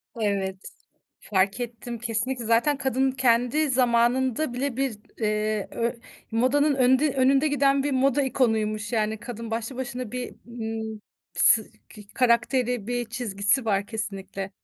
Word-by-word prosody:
Evet, 200 -4 -1 0.6
fark 200 +3 0
ettim. 235 0 -5
Kesinlikle, 240 +2 -2
zaten 230 +6 +3
kadın 265 0 +1
kendi 255 +4 +2
zamanında 250 +2 +2
bile 260 0 -2
bir, 265 -5 -1 0.2
eee, 215 -1 0
ö 235 0 -1 0.4
modanın 270 +6 +2
önünde 260 +2 +3
önünde 270 +3 +3
giden 275 -1 +2
bir 285 0 -1
moda 270 +2 +2
ikonuymuş. 220 -4 0
Yani 220 -1 0
kadın 230 -2 -7
başlı 230 +3 -3
başına 250 -3 -5
bir, 250 -1 -5
ımm, 220 -2 -5 0.3
s 225 - +5 0.3
kı 210 - -11
karakteri, 245 -2 +2
bir 245 -1 -2
çizgisi 230 0 0
var 200 -2 0
kesinlikle. 195 -3 -5
240 Hz, 130 wpm, -25 LUFS, 220-260 Hz, 0.6 s, s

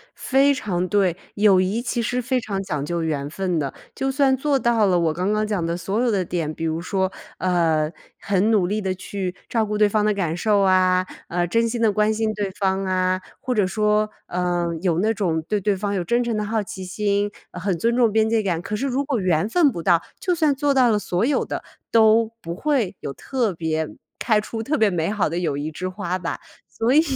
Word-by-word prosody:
非 275 +2 +3
常 185 -8 -2
对， 185 -2 +2 0.2
友 200 -2 +5
谊 195 +5 0
其 240 0 -2
实 245 +2 -1
非 255 +1 0
常 200 -4 -3
讲 150 -7 -3
究 170 +2 -2
缘 145 -3 -2
分 180 0 -1
的。 140 -3 -3 0.2
就 270 0 -1
算 270 -1 +3
做 280 +1 +1
到 235 -3 +3
了 180 -3 +3
我 165 -2 +1
刚 185 +5 -1
刚 215 0 +1
讲 205 -5 -1
的 170 0 -1
所 195 +6 -1
有 250 - +2
的 195 -3 +1
点， 165 -3 -3
比 160 - -7
如 160 +1 -1
说， 190 +1 -1 0.3
呃， 165 -4 +1 0.3
很 200 +2 +1
努 200 -5 +3
力 210 +3 -1
地 190 -2 -1
去 185 -1 -5
照 225 -2 +1
顾 210 0 -2
对 210 0 +5
方 210 0 +1
的 210 - +3
感 175 -5 -1
受 205 +2 +2
啊， 185 -1 +3 0.2
呃， 175 0 0
真 230 +6 +2
心 235 0 -3
的 225 -2 +4
关 210 +1 +2
心 220 0 -1
对 205 -1 -2
方 195 -1 -1
啊， 185 0 +1 0.2
或 255 - -1
者 210 -5 +2
说， 210 +2 +1 0.2
呃， 175 -1 -1
有 175 -3 +1
那 220 +4 +2
种 175 -6 0
对 210 - 0
对 205 +1 +1
方 200 +1 -2
有 190 -3 -1
真 240 +7 +1
诚 235 -2 -1
的 210 - -1
好 220 +1 0
奇 190 -1 -7
心， 205 +2 0 0.2
很 180 0 -2
尊 235 +7 +1
重 240 -3 +3
边 220 +1 +2
界 225 -1 +2
感。 175 -5 -1
可 210 +3 -4
是 270 +6 -1
如 270 +2 0
果 275 -4 -1
缘 180 -1 +1
分 305 +2 +4
不 170 - -5
到， 170 +1 +4 0.2
就 365 - 0
算 310 -4 +2
做 285 +1 +1
到 255 -3 +4
了 210 -2 +2
所 180 +1 0
有 290 - +1
的， - - -5 0.3
都 225 0 +5
不 170 +1 -5
会 250 -4 0
有 140 - -5
特 240 - -1
别 160 -1 -2 0.3
开 215 -3 +2
出 220 +1 -5
特 305 +6 0
别 220 -4 +4
美 170 -2 -1
好 210 -6 0
的 170 +3 -2
友 155 -5 -1
谊 150 +2 -3
之 180 +4 -4
花 185 -1 -3
吧。 175 -2 -4 0.4
所 230 +3 +3
以 305 - +7
200 Hz, 250 characters per minute, -22 LUFS, 180-225 Hz, 0.4 s, 以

